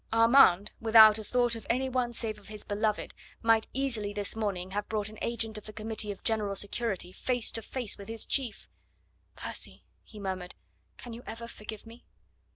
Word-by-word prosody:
Armand, 225 -4 +6
without 220 -1 +8
a - - -6
thought 245 +1 +2
of 225 -2 -7
any 255 +3 +1
one 250 -2 0
save 225 -2 -2
of 205 - -18
his 210 0 -8
beloved, 210 +1 -1 0.3
might 225 -1 +4
easily 235 -6 -2
this 205 0 0
morning 195 -4 -2
have 205 +1 -3
brought 210 -1 0
an 215 - -11
agent 225 -2 -1
of 210 - -13
the - - -7
Committee 215 -1 -2
of 195 - -10
General 210 -3 0
Security 200 -2 -2
face 245 +3 0
to 225 - -3
face 235 -1 -3
with 200 - -9
his 225 -1 -1
chief. 255 -6 -1 0.7
"Percy," - - -4 0.2
he 215 - -14
murmured, 185 -2 -4 0.4
"can 240 - -9
you 235 - -8
ever 230 +1 -6
forgive 215 -1 -9
me?" 230 +2 -13
220 Hz, 185 wpm, -30 LUFS, 205-235 Hz, 0.7 s, without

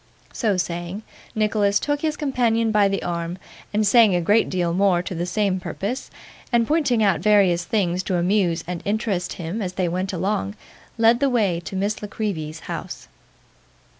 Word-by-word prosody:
So 210 -5 0
saying, 175 +3 -3 0.3
Nicholas 210 -2 +2
took 290 -1 -1
his 310 -2 -1
companion 235 -6 +1
by 210 -2 +4
the 195 -1 -2
arm, 170 0 -3 0.3
and 210 +1 +1
saying 215 -2 +5
a - - +2
great 205 +6 +3
deal 175 -2 0
more 185 -1 +2
to 185 - -5
the 175 +1 -3
same 190 0 0
purpose, 205 +7 -4 0.4
and 235 -2 +3
pointing 280 -8 +2
out 195 -6 +3
various 185 -3 +3
things 180 -3 0
to 185 - 0
amuse 175 -2 +1
and 175 -1 -5
interest 205 -4 -1
him 175 +6 -5
as 185 -2 -3
they 185 -1 0
went 185 +3 -2
along, 175 - -2 0.4
led 230 +1 +4
the 280 0 +2
way 205 -9 +1
to 175 - -6
Miss 200 +3 -1
La 210 - -5
Creevy's 165 -8 -4
house. - - -7
195 Hz, 175 wpm, -22 LUFS, 175-220 Hz, 0.4 s, saying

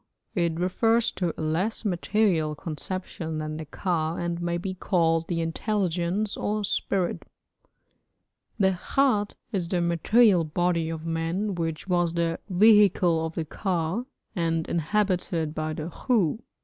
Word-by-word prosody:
It 170 -3 0
refers 225 +6 +2
to 175 -3 -1
a - - -2
less 180 +9 -1
material 180 -4 +1
conception 165 0 -5
than 155 0 -4
the 160 - -6
ka, 160 0 -1
and 175 0 -3
may 170 0 -1
be 185 +2 -4
called 165 -3 +1
the 170 -2 -1
intelligence 185 +2 -1
or 210 0 -1
spirit. 190 -2 -1 1.3
The 190 -3 +2 0.2
khat 235 -7 +3 0.2
is 185 -6 -1
the 180 - +1
material 175 +3 +4
body 170 +1 0
of 165 0 -5
man 165 +5 -1
which 165 -1 -3
was 175 -2 +1
the 170 -1 0
vehicle 190 -4 +5
of 160 0 -4
the 165 - -2
ka, 180 +6 -2 0.3
and 165 -2 0
inhabited 175 -2 0
by 155 0 -2
the 155 +2 -5
khu. 215 - +1
175 Hz, 135 wpm, -26 LUFS, 165-195 Hz, 1.3 s, vehicle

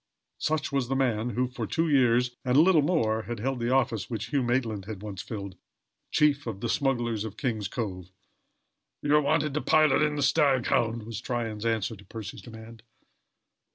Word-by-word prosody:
Such 155 0 -1
was 135 -3 0
the 135 - -1
man, 120 -4 +1
who, 125 0 +2
for 125 - -5
two 165 +1 0
years 125 -4 +3
and 125 0 +2
a - - +8
little 170 -2 +5
more, 125 -9 +1
had 120 - -3
held 130 +3 -2
the 120 0 -1
office 120 -6 +1
which 115 -2 -4
Hugh 140 - +2
Maitland 120 -5 -1
had 105 -2 -7
once 100 -3 -6
filled 100 -4 -7 0.5
chief 145 -3 +2
of 105 -4 -4
the 115 - -3
Smugglers 120 -6 0
of 110 -1 -7
King's 110 -7 -2
Cove. 95 -5 -5 0.9
"You 145 0 +3
are 150 - +5
wanted 150 0 +1
to 150 - -1
pilot 155 -2 +4
in 150 -1 +1
the 145 - -1
Staghound," 130 -5 +2
was 110 -1 -6
Tryon's 115 -3 -3
answer 110 -1 -1
to 100 - -15
Percy's 110 -1 -8
demand. 110 -1 -12
120 Hz, 190 wpm, -27 LUFS, 110-140 Hz, 0.9 s, a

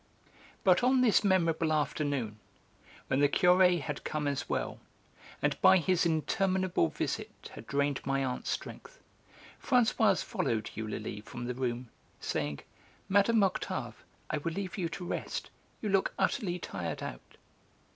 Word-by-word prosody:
But 185 +3 +4
on 255 +1 +4
this 230 -4 +4
memorable 165 -5 +2
afternoon, 145 -7 -1 0.7
when 130 - 0
the 145 0 +5
Curé 180 0 +5
had - - -5
come 150 -1 -2
as 140 -2 -2
well, - - -2 0.6
and - - 0
by 190 - +7
his 180 0 +2
interminable 185 - +1
visit - - -5
had - - -10
drained 140 0 0
my 135 0 0
aunt's 125 -1 -3
strength, - - -6 0.6
Françoise 225 -6 +3
followed 110 -2 -2
Eulalie 110 -1 -5
from 120 +3 -7
the 125 - -2
room, 125 -1 -3 0.3
saying: 75 -1 -2 0.5
"Mme. 205 +3 +4
Octave, 190 - -2 0.3
I - - 0
will 165 +3 -3
leave 190 0 -4
you 175 -4 -2
to 180 0 -6
rest; - - -4 0.3
you 210 - 0
look 195 -1 +1
utterly 185 -9 0
tired 90 - -5
out." - - -8
165 Hz, 140 wpm, -31 LUFS, 130-190 Hz, 0.7 s, by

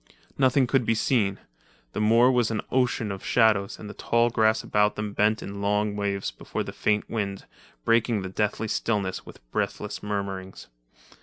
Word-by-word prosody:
Nothing 130 0 +3
could 130 +1 +2
be 115 - +1
seen. 105 -4 +1 0.6
The - - -3
moor 115 +4 +5
was 120 -3 +2
an 110 -2 -1
ocean 125 -4 +1
of 95 - -6
shadows 110 -4 +2
and 105 - -9
the 105 - -7
tall 120 +2 +1
grass 110 -1 +2
about 105 0 +2
them 105 -1 -4
bent 105 +2 +2
in 100 0 -6
long 105 +1 +1
waves 100 -1 -2
before - - -5
the, - - -7
faint 105 -1 0
wind, 100 -3 -3 0.4
breaking 115 -3 +2
the - - -4
deathly 105 +3 -1
stillness 100 -3 -2
with - - -14
breathless - - -3
murmurings. 100 -4 -5
105 Hz, 170 wpm, -26 LUFS, 100-115 Hz, 0.6 s, moor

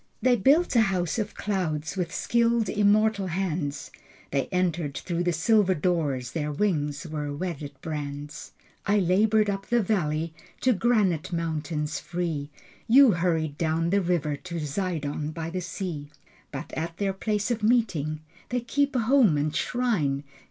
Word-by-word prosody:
They 255 -1 +4
built 280 - +3
a 230 - +7
house 185 -2 0
of 210 -1 -3
clouds 170 -6 -2
With 180 -3 -2
skilled 235 -2 +1
immortal 210 -1 +3
hands. 165 -5 -2 0.4
They 140 -1 0
entered 175 -5 -1
through 170 -1 -2
the 175 0 +1
silver 190 +3 +3
doors. 145 -7 0
Their 150 -2 -2
wings 150 -4 -1
were 150 -2 -4
wedded 145 -2 -4
brands. 150 -1 -6 0.4
I 205 +1 +4
labored 205 +3 +3
up 195 -1 -3
the 240 -2 +2
valley 165 -5 0 0.3
To 255 - +4
granite 200 -7 +1
mountains 155 -2 -2
free. 165 -5 -3 0.4
You 260 +1 +7
hurried 165 -4 0
down 165 +1 +1
the 200 0 +3
river 170 -5 0
To 175 +3 -8
Zidon 150 -2 -2
by 165 0 -4
the 185 +1 -3
sea. 170 -4 -5 0.4
But 135 - -7
at 165 +1 -4
their 195 -1 0
place 210 +3 -1
of 230 -2 -1
meeting 190 -10 +1 0.3
They 245 0 0
keep 280 +4 0
a 250 - +3
home 230 - +4
and 150 +1 -1
shrine. 170 - 0
175 Hz, 150 wpm, -26 LUFS, 155-210 Hz, 0.4 s, a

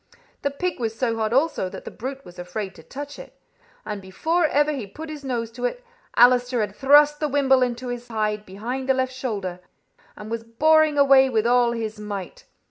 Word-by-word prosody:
The 280 - 0
pig 340 +4 -3
was 225 -2 -3
so 230 -2 0
hot 220 -1 -1
also 270 - +1
that - - -10
the - - -6
brute 265 +4 -7
was 180 0 -13
afraid 190 +2 -5
to - - -14
touch 285 - -8
it, - - -13 0.5
and 210 -2 -5
before 320 - 0
ever 295 +1 +2
he 260 -8 -4
put 310 +10 -8
his 295 -2 -8
nose 235 -4 -3
to 245 +1 -4
it - - -3 0.3
Allister 245 0 +5
had 205 -1 -3
thrust 295 +3 +5
the 300 - -1
wimble 270 -2 +3
into 250 0 -1
his 245 0 -5
hide, 215 -2 -2
behind 240 +8 -5
the 265 - +4
left 260 0 -1
shoulder, 205 -9 -4 0.6
and 210 +1 -9
was 230 0 -3
boring 310 +6 +3
away 275 -1 +6
with 225 -3 +1
all 240 0 +3
his 220 -2 -4
might. 200 -3 -7
245 Hz, 205 wpm, -23 LUFS, 215-280 Hz, 0.6 s, away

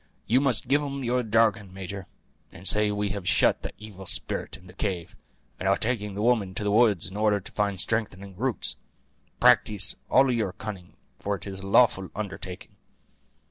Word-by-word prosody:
You 125 +4 +3
must 135 -6 +2
give 145 +2 +3
'em 140 -2 -4
your 125 +1 +1
jargon, 110 -3 +2
major; 95 0 -7 0.4
and 95 +1 -10
say 105 0 +3
that 105 - -2
we 105 0 -1
have 100 -1 -3
shut - - +3
the - - -5
evil 100 -3 -10
spirit - - -3
in 90 - -19
the 90 - -14
cave, 90 -3 -3 0.4
and 95 - 0
are 100 - +3
taking 105 -4 -1
the 105 - -2
woman 110 -6 +1
to 105 - -2
the 105 - 0
woods 105 -5 +3
in - - -10
order 105 -1 +2
to 95 - -11
find 100 -2 -1
strengthening 100 -2 -3
roots. 125 +3 -1 0.6
Practise 105 -2 +5
all 135 0 +5
your 110 -6 -1
cunning, 95 -5 -8 0.2
for 100 0 -1
it 95 - -8
is 95 -1 -6
a 95 - -8
lawful 95 -3 +4
undertaking." 95 -3 -6
105 Hz, 190 wpm, -26 LUFS, 95-115 Hz, 0.6 s, Practise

